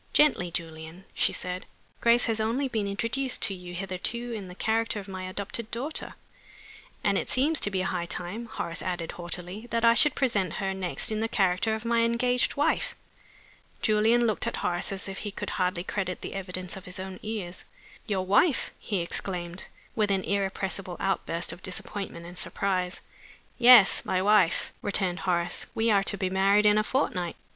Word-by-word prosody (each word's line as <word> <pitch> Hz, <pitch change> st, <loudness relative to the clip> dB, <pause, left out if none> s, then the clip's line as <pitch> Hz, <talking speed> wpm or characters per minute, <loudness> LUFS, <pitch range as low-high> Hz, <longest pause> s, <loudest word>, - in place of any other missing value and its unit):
"Gently, 285 Hz, -12 st, +4 dB
Julian," 165 Hz, +1 st, -6 dB
she -, -, +2 dB
said. 180 Hz, 0 st, -4 dB, 0.3 s
"Grace 235 Hz, +1 st, +5 dB
has 225 Hz, -2 st, 0 dB
only 235 Hz, +6 st, 0 dB
been 220 Hz, -5 st, -1 dB
introduced 235 Hz, +6 st, 0 dB
to 200 Hz, -, +2 dB
you 180 Hz, -1 st, -8 dB
hitherto 195 Hz, +6 st, -3 dB
in 205 Hz, -4 st, -5 dB
the 180 Hz, -, -10 dB
character 225 Hz, +1 st, 0 dB
of 200 Hz, -, -9 dB
my 185 Hz, -1 st, -5 dB
adopted 205 Hz, +4 st, -5 dB
daughter 270 Hz, +7 st, -5 dB, 0.4 s
" -, -, -20 dB
"And -, -, +3 dB
it -, -, -5 dB
seems 295 Hz, +5 st, +2 dB
to -, -, +3 dB
be 190 Hz, -2 st, -1 dB
high 180 Hz, -2 st, -2 dB
time," 190 Hz, +8 st, -5 dB
Horace 170 Hz, -6 st, -4 dB
added, 175 Hz, -3 st, -3 dB
haughtily, 180 Hz, +5 st, -7 dB
"that 230 Hz, 0 st, +1 dB
I 230 Hz, -, +7 dB
should 295 Hz, +4 st, +5 dB
present 200 Hz, -, +1 dB
her 195 Hz, -1 st, -2 dB
next 190 Hz, +2 st, 0 dB
in 215 Hz, -, -1 dB
the 225 Hz, -, 0 dB
character 195 Hz, +1 st, +1 dB
of 220 Hz, +1 st, -7 dB
my 235 Hz, 0 st, +2 dB
engaged 240 Hz, +2 st, +2 dB
wife." 290 Hz, -, +1 dB, 0.9 s
Julian 220 Hz, +3 st, +4 dB
looked 215 Hz, -3 st, 0 dB
at -, -, -1 dB
Horace 175 Hz, +2 st, -1 dB
as 195 Hz, 0 st, -5 dB
if 195 Hz, 0 st, -6 dB
he 210 Hz, -, -4 dB
could 200 Hz, -, -5 dB
hardly 180 Hz, -1 st, 0 dB
credit 185 Hz, -2 st, -3 dB
the -, -, -6 dB
evidence 185 Hz, -2 st, -4 dB
of 190 Hz, -, -9 dB
his 180 Hz, +2 st, -5 dB
own 190 Hz, 0 st, -6 dB
ears. 210 Hz, -5 st, -5 dB, 0.4 s
"Your 190 Hz, -4 st, 0 dB
wife!" 245 Hz, -, +3 dB
he 200 Hz, -5 st, -2 dB
exclaimed, 175 Hz, 0 st, -3 dB, 0.3 s
with 215 Hz, -2 st, +2 dB
an 195 Hz, -1 st, +1 dB
irrepressible 195 Hz, -2 st, -2 dB
outburst 180 Hz, -3 st, -1 dB
of 180 Hz, -, -12 dB
disappointment 185 Hz, -1 st, -5 dB
and 175 Hz, +1 st, -5 dB
surprise. 185 Hz, -2 st, -1 dB, 0.6 s
"Yes. 240 Hz, -4 st, +8 dB
My 185 Hz, -, 0 dB
wife," 195 Hz, -3 st, +3 dB
returned 195 Hz, -3 st, 0 dB
Horace. 175 Hz, -2 st, -1 dB
"We 225 Hz, 0 st, +2 dB
are 200 Hz, -1 st, +4 dB
to 200 Hz, -, 0 dB
be 185 Hz, -2 st, -1 dB
married 195 Hz, +2 st, +4 dB
in 210 Hz, 0 st, +6 dB
a -, -, +2 dB
fortnight. 180 Hz, -9 st, -1 dB
195 Hz, 185 wpm, -28 LUFS, 180-225 Hz, 0.9 s, Yes